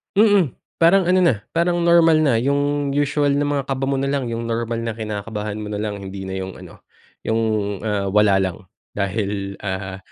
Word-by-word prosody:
Mm. 205 - +4 0.2
Parang 175 +4 +5
ano 185 0 +4
na, 115 -11 +2
parang 175 +1 +1
normal 165 -2 +5
na 135 -7 +3
yung 140 +2 0
usual 145 0 +1
na 145 +1 +1
mga 140 -1 0
kaba 135 0 -2
mo 135 - 0
na 135 - -1
lang 140 -3 -1
yung 115 0 -3
normal 115 0 -2
na 115 - -2
kinakabahan 105 -1 -5
mo 105 -1 -5
na 105 - -3
lang 105 -1 -3
hindi 95 0 -7
na 95 0 -5
yung 95 0 -5
ano, - - -14 0.4
yung, 110 +1 +1 0.4
ah, 105 -2 -1
wala 105 -2 +5
lang, 95 0 -2 0.3
dahil 100 0 -2
ah, 95 -1 -4
115 Hz, 190 wpm, -21 LUFS, 105-145 Hz, 0.4 s, Parang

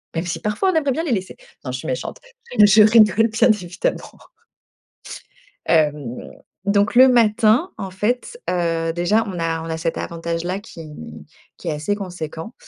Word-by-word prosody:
Même 165 +2 -2
si 175 - -3
parfois 210 - 0
on - - -4
aimerait 290 -4 +1
bien 320 +6 -2
les 300 - -2
laisser. 190 -2 -4 0.3
Non, 130 - -5
je 130 - -3
suis - - -8
méchante. 130 0 -4 0.4
Je 210 +1 +7
rigole, 220 0 +5
bien 220 +2 +3
évidemment. 185 -3 -4 1.5
Hem, 150 -6 0 0.3
donc, 200 +2 +1
le 260 +2 +8
matin, 235 - +3
en 190 -1 -6
fait, 245 - -2
heu, 165 -2 0
déjà 200 +6 +2
on 180 -3 -5
a 165 -1 -1
on - - -7
a 160 0 -3
cet 165 0 -3
avantage 170 0 -4
là 185 +2 -2
qui 160 -6 -11 0.7
qui 170 - -6
est - - 0
assez 155 +8 -2
conséquent 180 -1 -7
190 Hz, 170 wpm, -20 LUFS, 165-220 Hz, 1.5 s, le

